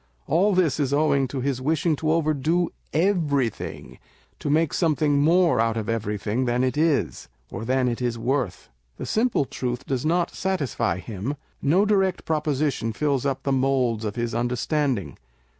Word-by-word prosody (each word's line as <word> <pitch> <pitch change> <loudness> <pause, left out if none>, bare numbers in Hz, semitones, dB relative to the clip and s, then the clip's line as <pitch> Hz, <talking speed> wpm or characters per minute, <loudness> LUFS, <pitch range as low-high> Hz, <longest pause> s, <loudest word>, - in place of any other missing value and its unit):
All 190 +5 +2
this 165 -6 +2
is 140 -1 0
owing 140 -3 +2
to 130 +1 -4
his 130 -1 -1
wishing 155 +3 +1
to 155 +1 0
overdo 160 +2 +1 0.2
everything 155 - 0
â€" - - -15 0.4
to - - -3
make 155 +1 +2
some 160 -4 +2
thing 145 -2 +2
more 165 -3 +4
out 115 0 +1
of 110 -1 -3
everything 110 +2 -1
than 120 +1 +1
it 130 +1 0
is, 155 - 0 0.2
or 115 - -5
than 130 +1 +1
it 120 0 -2
is 120 -2 -1
worth. 120 - -2 0.3
The - - -5
simple 220 - +1
truth 125 -1 -4
does 130 -2 -2
not 170 +2 +1
satisfy 150 - -1
him 105 +6 -4
â€" - - -10 0.3
no 175 +9 +3
direct 195 -3 +1
proposition 150 -6 0
fills 140 +1 0
up 135 -1 -2
the 140 - 0
moulds 130 -4 +1
of 105 -2 -3
his 120 -1 -2
understanding. 125 - -1
140 Hz, 175 wpm, -24 LUFS, 120-160 Hz, 0.4 s, more